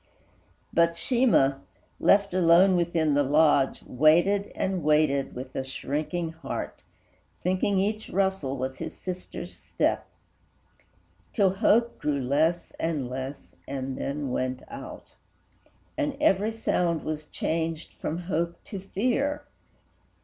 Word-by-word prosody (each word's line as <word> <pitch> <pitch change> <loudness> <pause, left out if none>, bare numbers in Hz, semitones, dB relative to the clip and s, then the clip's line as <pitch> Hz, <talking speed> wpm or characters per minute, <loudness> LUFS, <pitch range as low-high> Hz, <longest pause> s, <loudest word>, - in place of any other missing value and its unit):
But 170 0 +4
Sheemah, 195 - +3 0.4
left 200 -1 +4
alone 180 +1 +5
within 165 -3 +1
the 145 - +3
lodge, 145 -1 +3
Waited 175 +9 +3
and 185 -3 -1
waited, 150 -2 +2
with 130 +1 -8
a 135 - -1
shrinking 155 +5 -3
heart, 165 0 -6 0.6
Thinking 185 +2 +1
each 215 +3 -1
rustle 190 -8 0
was 130 +1 -4
his - - -5
sister's 185 -1 -6
step, - - -1 1.3
Till 195 -4 +3
hope 225 +4 +2
grew 150 -2 0
less 155 +7 +1
and 150 -7 -2
less, 130 +2 -6
and 135 -1 -4
then 140 -1 -3
went 130 0 -2
out, - - -9 0.9
And 290 -2 -1
every 210 -7 +3
sound 175 -7 0
was 155 0 -4
changed 160 +1 -3
from 160 - -4
hope 170 -1 -1
to 200 - -7
fear. 255 +9 -1
165 Hz, 120 wpm, -27 LUFS, 140-195 Hz, 1.3 s, alone